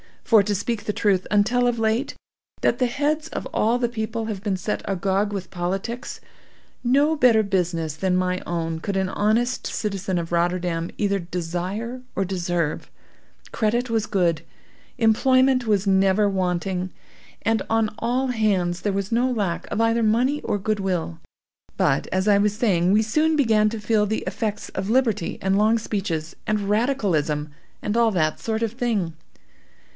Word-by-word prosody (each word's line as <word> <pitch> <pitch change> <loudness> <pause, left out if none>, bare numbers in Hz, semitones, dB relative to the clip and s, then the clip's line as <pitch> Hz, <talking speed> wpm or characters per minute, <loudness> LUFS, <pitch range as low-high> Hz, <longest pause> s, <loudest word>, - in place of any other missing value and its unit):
For, 220 -3 +5
to 205 +1 -1
speak 220 +2 -3
the 210 - -1
truth, 195 -4 +1
until 240 +4 +3
of 240 -1 0
late 225 +4 0
years, - - -21 0.4
that - - +2
the 255 - +3
heads 300 +5 -1
of - - -5
all 230 +3 +1
the 240 -1 0
people 225 0 -3
have 210 -4 -4
been 205 -2 -1
set 210 +3 -3
agog 195 +2 0
with 195 -2 -5
politics, 195 +7 -4 0.6
no 285 +6 +3
better 235 -5 +5
business 170 -6 -1
than 185 +1 +1
my 185 0 0
own 165 -1 -2
could 200 +4 -3
an 190 -1 0
honest 230 +6 0
citizen 195 -3 -2
of 170 -1 -3
Rotterdam 175 -1 0
either 200 -1 +1
desire 180 +8 -4
or 195 - +1
deserve. 175 -4 -2 0.6
Credit 235 +3 0
was 220 -2 +1
good, 170 -5 +1 0.6
employment 255 +2 +3
was 205 -2 +2
never 195 +1 +3
wanting, 185 -1 -1 0.5
and 225 0 +1
on 225 -1 +1
all 250 +3 0
hands 195 -7 0
there 205 - -1
was 195 +1 -2
no 240 +3 +2
lack 200 -8 -2
of 220 - -1
either 230 +1 +2
money 245 +7 +2
or - - 0
good 210 +1 -1
will. 180 - -2 0.6
But, - - +1
as 190 +2 -1
I 205 -1 +5
was 205 0 +2
saying, 185 -5 +2
we 215 - +5
soon 305 +9 +2
began 220 -7 +3
to 220 0 -6
feel 210 0 +2
the 220 +2 -2
effects 215 -2 -3
of 190 +1 -4
liberty 225 -6 +1
and 190 +1 +1
long 215 +2 +4
speeches, 190 -8 -3
and 210 -2 0
radicalism, 190 - 0 0.3
and 210 +2 -1
all 230 -1 +4
that 155 -5 0
sort 225 0 -2
of 225 - 0
thing. 225 -8 -1
210 Hz, 170 wpm, -23 LUFS, 185-230 Hz, 0.6 s, For